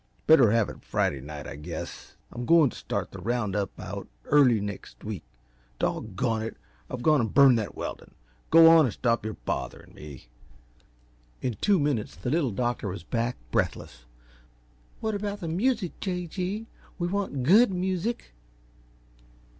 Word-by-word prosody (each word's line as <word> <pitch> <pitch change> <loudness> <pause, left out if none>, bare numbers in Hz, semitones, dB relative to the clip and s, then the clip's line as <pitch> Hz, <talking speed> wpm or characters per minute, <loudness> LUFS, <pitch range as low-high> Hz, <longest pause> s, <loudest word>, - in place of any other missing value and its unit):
Better 155 -8 +7
have 115 -2 +3
it - - -10
Friday 70 - -1
night, 75 +1 -8
I - - -7
guess 80 +3 -7 0.2
I'm 120 - -6
goin 160 -6 +5
t' - - -12
start - - -4
the - - -9
round 115 -4 -1
up 100 -3 0
out - - -6 0.2
early 135 -6 +5
next 100 -1 -7
week. - - -5 0.6
Doggone 110 +2 -1
it! 115 - -5 0.3
I've 125 -1 -5
gone 150 -2 +4
and 110 - -2
burned 135 -4 +6
that 105 - -5
weldin'. - - -7 0.3
Go 165 0 +8
on 160 -2 +6
and 120 - -2
stop 115 -3 +1
your 110 0 -4
botherin' 65 - -5
me!" 70 -5 -11 1.2
In 125 -3 -1
two 200 -3 +3
minutes 140 -7 -1
the 125 - -4
Little 155 -4 +2
Doctor 120 +1 -2
was 95 -3 -5
back, 115 +5 -2
breathless. - - -2 1.0
"What 220 0 -1
about 205 0 -3
the 170 - -4
music, 200 +2 0
J. 180 -2 -3
G.? 190 +6 -4 0.3
We 175 -2 -1
want 185 -9 -2
GOOD 205 - +6
music." 185 - -2
125 Hz, 160 wpm, -27 LUFS, 105-180 Hz, 1.2 s, Go